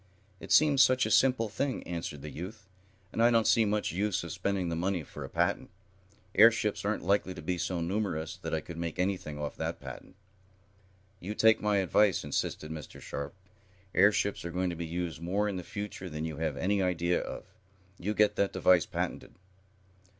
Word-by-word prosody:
"It -, -, -9 dB
seems 145 Hz, -3 st, +6 dB
such 130 Hz, -1 st, +5 dB
a -, -, -2 dB
simple 125 Hz, -4 st, +4 dB
thing," 130 Hz, +5 st, -2 dB
answered 85 Hz, -5 st, -5 dB
the 75 Hz, -, -6 dB
youth. 95 Hz, +5 st, -8 dB, 0.5 s
"And 115 Hz, -, 0 dB
I 120 Hz, -, +6 dB
don't 115 Hz, -2 st, +3 dB
see 115 Hz, -, +4 dB
much 105 Hz, 0 st, 0 dB
use 100 Hz, +1 st, -1 dB
of 85 Hz, -, -6 dB
spending 95 Hz, -1 st, -1 dB
the 85 Hz, -, -2 dB
money 90 Hz, 0 st, -1 dB
for -, -, -9 dB
a -, -, -7 dB
patent. -, -, 0 dB, 0.6 s
Airships 110 Hz, -1 st, +5 dB
aren't 100 Hz, +2 st, -1 dB
likely 100 Hz, -2 st, +1 dB
to 85 Hz, -, -8 dB
be 90 Hz, +2 st, -2 dB
so 90 Hz, -1 st, -1 dB
numerous 85 Hz, -3 st, -2 dB
that -, -, -6 dB
I 80 Hz, -, 0 dB
could 85 Hz, +1 st, -9 dB
make 85 Hz, 0 st, -4 dB
anything 90 Hz, -5 st, -2 dB
off 75 Hz, -2 st, -4 dB
that -, -, -3 dB
patent." -, -, -10 dB, 1.0 s
"You 100 Hz, +4 st, -5 dB
take 110 Hz, 0 st, +5 dB
my 105 Hz, -1 st, +2 dB
advice," 100 Hz, +1 st, +3 dB
insisted 75 Hz, +1 st, -3 dB
Mr. 80 Hz, -2 st, -8 dB
Sharp. 70 Hz, +3 st, -6 dB, 0.6 s
"Airships 100 Hz, 0 st, +3 dB
are 85 Hz, -, -4 dB
going 90 Hz, +1 st, -1 dB
to -, -, -5 dB
be 85 Hz, 0 st, -5 dB
used 85 Hz, -1 st, -4 dB
more 100 Hz, +5 st, 0 dB
in 100 Hz, -2 st, -2 dB
the 90 Hz, -, -5 dB
future 100 Hz, -1 st, -6 dB
than 75 Hz, 0 st, -4 dB
you 80 Hz, -2 st, -5 dB
have 80 Hz, -3 st, -2 dB
any 100 Hz, +4 st, +1 dB
idea 90 Hz, -1 st, +1 dB
of. -, -, -6 dB, 0.6 s
You 105 Hz, +4 st, -2 dB
get 105 Hz, 0 st, +3 dB
that 100 Hz, -, +1 dB
device 90 Hz, -2 st, +4 dB
patented." -, -, -4 dB
95 Hz, 195 wpm, -30 LUFS, 85-105 Hz, 1.0 s, seems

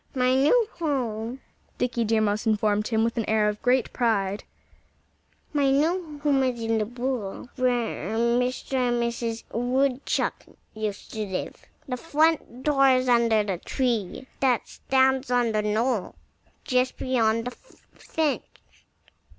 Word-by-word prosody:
"My 255 Hz, 0 st, +3 dB
new 305 Hz, -, +4 dB
home 250 Hz, -5 st, -2 dB, 0.2 s
" -, -, -38 dB
Dickie 240 Hz, -1 st, 0 dB
Deer 220 Hz, 0 st, +2 dB
Mouse 215 Hz, +1 st, 0 dB
informed 210 Hz, -1 st, +1 dB
him 220 Hz, -1 st, +1 dB
with 230 Hz, +1 st, -1 dB
an 225 Hz, -, 0 dB
air 215 Hz, -1 st, +3 dB
of 210 Hz, 0 st, -2 dB
great 250 Hz, -1 st, +2 dB
pride 205 Hz, -5 st, 0 dB, 1.1 s
"my 285 Hz, -2 st, +3 dB
new 310 Hz, +3 st, +1 dB
home 280 Hz, -2 st, +3 dB
is 255 Hz, -2 st, 0 dB
in 225 Hz, -1 st, 0 dB
the 215 Hz, -, 0 dB
burrow 245 Hz, -3 st, -4 dB
where 240 Hz, -, -1 dB
Mr. 245 Hz, +3 st, 0 dB
and 245 Hz, -1 st, +1 dB
Mrs. 235 Hz, -1 st, -3 dB
Woodchuck 255 Hz, +3 st, 0 dB, 0.3 s
used 215 Hz, -2 st, -5 dB
to 220 Hz, -, -2 dB
live. 190 Hz, -1 st, -5 dB, 0.2 s
The 250 Hz, -2 st, -3 dB
front 310 Hz, -4 st, +1 dB
door 275 Hz, -2 st, +4 dB
is 255 Hz, 0 st, +3 dB
under 230 Hz, -3 st, +4 dB
the 195 Hz, -4 st, -3 dB
tree 240 Hz, -2 st, -2 dB
that 255 Hz, -3 st, +2 dB
stands 265 Hz, 0 st, +1 dB
on 245 Hz, -2 st, +2 dB
the 215 Hz, -1 st, +1 dB
knoll 215 Hz, +1 st, 0 dB, 0.5 s
just 255 Hz, 0 st, +1 dB
beyond 230 Hz, -3 st, +1 dB
the 250 Hz, -, -3 dB
fence. 315 Hz, -, -4 dB
245 Hz, 140 wpm, -25 LUFS, 220-265 Hz, 1.1 s, new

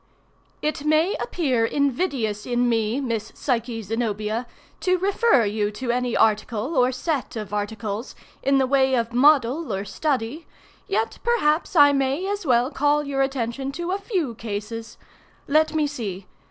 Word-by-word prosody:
"It 305 Hz, -1 st, -1 dB
may 310 Hz, +6 st, +3 dB
appear 270 Hz, -, 0 dB
invidious 250 Hz, -, 0 dB
in 245 Hz, 0 st, +1 dB
me, 225 Hz, +1 st, +1 dB
Miss 230 Hz, -5 st, -3 dB
Psyche 235 Hz, -3 st, -2 dB
Zenobia, 220 Hz, +1 st, -2 dB, 0.3 s
to 365 Hz, 0 st, +2 dB
refer 390 Hz, -, +3 dB
you 205 Hz, 0 st, 0 dB
to 240 Hz, +3 st, -2 dB
any 245 Hz, 0 st, 0 dB
article, 225 Hz, +6 st, +1 dB
or 250 Hz, -1 st, +4 dB
set 270 Hz, +1 st, -3 dB
of 210 Hz, -2 st, -6 dB
articles, 210 Hz, +2 st, -4 dB, 0.3 s
in 275 Hz, 0 st, +3 dB
the 265 Hz, -, +3 dB
way 265 Hz, 0 st, +3 dB
of 235 Hz, -1 st, -1 dB
model 280 Hz, +1 st, +3 dB
or 195 Hz, 0 st, -2 dB
study, 275 Hz, +4 st, -2 dB, 0.4 s
yet 220 Hz, +3 st, -1 dB
perhaps 365 Hz, -10 st, +1 dB
I 290 Hz, -2 st, +8 dB
may 275 Hz, +6 st, 0 dB
as 405 Hz, -4 st, -3 dB
well 245 Hz, +2 st, +3 dB
call 295 Hz, +1 st, +2 dB
your 280 Hz, -1 st, -1 dB
attention 270 Hz, 0 st, -2 dB
to 345 Hz, +4 st, -3 dB
a 390 Hz, -, -1 dB
few 370 Hz, -, -2 dB
cases. 225 Hz, +1 st, -6 dB, 0.5 s
Let 310 Hz, +1 st, +3 dB
me 310 Hz, -1 st, +2 dB
see. 210 Hz, -10 st, -5 dB
255 Hz, 155 wpm, -23 LUFS, 225-300 Hz, 0.5 s, I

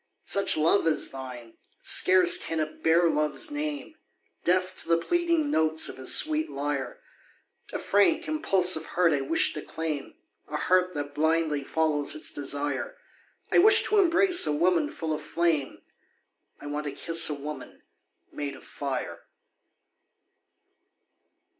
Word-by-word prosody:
Such 200 Hz, -4 st, +3 dB
love 165 Hz, +3 st, +2 dB
as 160 Hz, -, +1 dB
thine, 125 Hz, -3 st, -10 dB, 0.3 s
scarce 185 Hz, -1 st, +4 dB
can 165 Hz, -, -3 dB
it 155 Hz, 0 st, -5 dB
bear 170 Hz, +2 st, +3 dB
love's 150 Hz, -, -1 dB
name, 295 Hz, 0 st, -5 dB, 0.5 s
Deaf 185 Hz, +1 st, +1 dB
to -, -, -2 dB
the 165 Hz, 0 st, +3 dB
pleading 335 Hz, -, 0 dB
notes 160 Hz, -, +1 dB
of -, -, -8 dB
his 130 Hz, -, 0 dB
sweet 310 Hz, 0 st, +2 dB
lyre, 140 Hz, -2 st, -4 dB, 0.7 s
A -, -, -3 dB
frank, 205 Hz, +13 st, +1 dB
impulsive 190 Hz, -, +2 dB
heart 170 Hz, -1 st, +1 dB
I 140 Hz, -, 0 dB
wish 150 Hz, +5 st, +1 dB
to 150 Hz, -, -6 dB
claim, 155 Hz, -3 st, -5 dB, 0.3 s
A -, -, -4 dB
heart 185 Hz, -1 st, +1 dB
that 145 Hz, 0 st, -5 dB
blindly 155 Hz, -1 st, 0 dB
follows 150 Hz, -1 st, -1 dB
its 155 Hz, -, -1 dB
desire. 145 Hz, -, -4 dB, 0.5 s
I -, -, +5 dB
wish 430 Hz, +4 st, +7 dB
to 425 Hz, -, +1 dB
embrace 360 Hz, -, +4 dB
a -, -, +1 dB
woman 165 Hz, -1 st, +1 dB
full 160 Hz, -2 st, -4 dB
of 155 Hz, -, -5 dB
flame, 160 Hz, -3 st, -2 dB, 0.8 s
I -, -, -12 dB
want 145 Hz, +1 st, -5 dB
to 145 Hz, -, -5 dB
kiss 165 Hz, +3 st, +1 dB
a 150 Hz, -, -3 dB
woman 150 Hz, +2 st, -9 dB, 0.5 s
made 140 Hz, -1 st, -6 dB
of -, -, -15 dB
fire. 140 Hz, -2 st, -6 dB
160 Hz, 145 wpm, -26 LUFS, 145-185 Hz, 0.8 s, wish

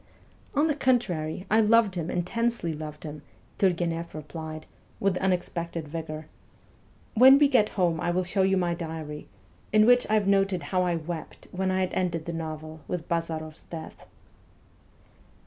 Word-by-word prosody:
' -, -, -28 dB
On 295 Hz, +2 st, +4 dB
the 315 Hz, -, +2 dB
contrary, 190 Hz, -, 0 dB
I 220 Hz, +1 st, +6 dB
loved 220 Hz, -2 st, +4 dB
him, 170 Hz, -2 st, -3 dB
intensely 205 Hz, 0 st, -1 dB
loved 150 Hz, 0 st, -7 dB
him,' 150 Hz, -2 st, -7 dB, 0.4 s
T\irgueneff 170 Hz, -3 st, 0 dB
replied, 155 Hz, +1 st, -7 dB, 0.3 s
with 195 Hz, -1 st, +1 dB
unexpected 170 Hz, -3 st, -2 dB
vigour. 155 Hz, 0 st, -5 dB, 0.5 s
' -, -, -32 dB
When 260 Hz, +4 st, +8 dB
we 290 Hz, 0 st, +6 dB
get 245 Hz, -6 st, +3 dB
home 170 Hz, -3 st, +2 dB
I -, -, 0 dB
will 180 Hz, +2 st, +1 dB
show 190 Hz, +2 st, 0 dB
you 190 Hz, 0 st, +3 dB
my 175 Hz, -2 st, +1 dB
diary, 160 Hz, -3 st, -6 dB, 0.4 s
in 215 Hz, 0 st, +6 dB
which 245 Hz, +1 st, +5 dB
I 215 Hz, -, +3 dB
have 210 Hz, -2 st, +2 dB
noted 195 Hz, -3 st, +2 dB
how 180 Hz, +6 st, 0 dB
I 175 Hz, -1 st, +1 dB
wept 165 Hz, 0 st, -6 dB
when 190 Hz, +1 st, -1 dB
I 185 Hz, 0 st, +1 dB
had 185 Hz, -, -1 dB
ended 170 Hz, -3 st, -1 dB
the 170 Hz, -, -4 dB
novel 155 Hz, -1 st, -6 dB
with 175 Hz, -2 st, -4 dB
Bazaroff 160 Hz, -2 st, -3 dB
's -, -, -16 dB
death.' 165 Hz, -2 st, -9 dB
175 Hz, 170 wpm, -27 LUFS, 160-195 Hz, 0.5 s, When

